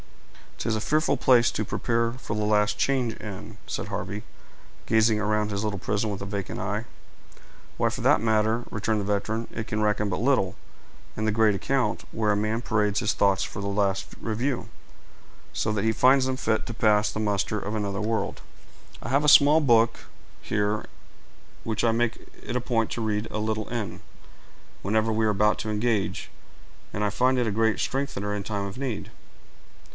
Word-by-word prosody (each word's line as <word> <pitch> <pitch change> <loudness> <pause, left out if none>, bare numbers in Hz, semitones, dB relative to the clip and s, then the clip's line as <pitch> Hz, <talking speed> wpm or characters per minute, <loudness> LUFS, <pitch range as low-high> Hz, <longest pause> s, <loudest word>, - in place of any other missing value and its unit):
"'Tis 110 - -1
a 110 - -2
fearful 155 +2 +1
place 125 -2 +4
to 105 - -2
prepare 115 +3 0
for 125 -4 -5
the 105 - -1
last 105 0 +2
change 130 -4 +1
in," 100 -4 -8
said - - -4
Harvey, 100 +3 -4 0.6
gazing 110 -1 +3
around 105 0 0
his 100 0 -2
little 105 -3 -2
prison 105 +3 -1
with 100 -2 -4
a - - -4
vacant 100 -1 -4
eye. 105 +3 -2 0.9
"Why, - - +2
for - - -5
the - - +5
matter 110 0 +2
of 120 - -8
that," - - -18
returned 105 +1 0
the - - -2
veteran, 110 +3 -1
"it 110 - -4
can 110 -1 -2
reckon 105 -1 +1
but 90 -1 -2
little 115 -7 +2 0.6
in 110 - -1
the 110 - +2
great 110 -1 +3
account, 125 +1 0
where 110 -2 +1
a - - +2
man 110 +2 -1
parades 105 -3 +1
his 110 -2 +1
thoughts 100 -1 +2
for - - -6
the 100 - -3
last 100 -1 -1
review, 120 +4 -2 0.8
so 110 - 0
that 105 -2 -1
he 110 - +3
finds 130 +3 +4
them 130 0 -1
fit 110 -4 0
to 115 - -5
pass 105 -3 +3
the - - -4
muster 105 0 0
of 105 +2 -4
another 100 -2 -2
world. 110 +1 -2 0.6
I - - -5
have 140 +3 +2
a - - +1
small 145 +2 +7
book 115 -4 +3 0.4
here, 105 0 -1 0.8
which 110 -2 -2
I 115 - +4
make 120 +1 -1 0.2
it 120 - -4
a 125 - +1
point 115 -2 0
to 120 - -3
read 105 0 -1
a 105 - -2
little 110 0 -2
in, 115 -4 -4 0.8
whenever 110 +3 +1
we 110 0 +1
are - - +3
about 105 +1 +2
to 110 - -3
engage, 105 -1 -1 0.6
and 105 - -2
I 105 - +2
find 125 +5 +2
it 120 - +1
a - - 0
great 110 +1 +1
strengthener 115 -7 -2
in 100 - -4
time 100 -1 -3
of 100 +4 -7
need." 130 -6 -4
110 Hz, 195 wpm, -26 LUFS, 105-115 Hz, 0.9 s, small